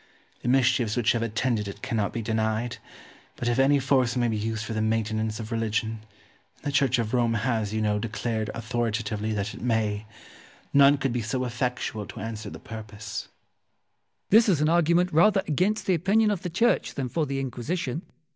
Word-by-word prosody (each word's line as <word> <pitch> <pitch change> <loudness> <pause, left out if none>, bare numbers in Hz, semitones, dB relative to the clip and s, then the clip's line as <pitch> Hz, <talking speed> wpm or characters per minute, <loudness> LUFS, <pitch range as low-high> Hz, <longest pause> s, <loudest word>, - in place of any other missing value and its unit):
The - - -5
mischiefs 125 -3 +3
which 120 -3 +3
have 120 - 0
attended 115 -1 0
it 100 - -8
cannot 110 -3 -1
be 115 - -4
denied; 110 +2 -1 0.6
but 120 - -4
if 120 +1 +1
any 140 +2 +5
force 130 -3 +2
may 120 -1 +2
be 110 - -1
used 110 +1 -2
for 110 - -4
the 110 - -1
maintenance 110 0 0
of 110 +1 -6
religion 110 0 -1 0.6
(and - - -29
the 145 - -1
Church 135 -2 +3
of 115 -1 -2
Rome 120 -2 +2
has, 110 -2 0
you 110 0 -1
know, 105 -1 +1
declared 110 0 -2
authoritatively 110 -2 -2
that 105 0 -2
it - - -10
may) 110 -3 0 0.7
none 140 +1 +7
could 135 -3 -1
be 120 - -1
so 130 +4 -2
effectual 120 -3 -2
to - - -9
answer 110 0 -5
the - - -8
purpose. 110 -2 -7
Wolsey. - - -44
This 220 +2 +6
is 175 -7 +3
an 150 +1 +2
argument 170 +1 +3
rather 195 +5 +5
against 185 +8 +1
the 190 - +3
opinion 205 +6 +3
of 195 -4 -2
the 180 - -3
Church 230 +8 +1
than 135 -3 -2
for 155 +4 -1
the 135 0 -2
Inquisition. 135 +3 -3
120 Hz, 195 wpm, -26 LUFS, 110-140 Hz, 0.7 s, none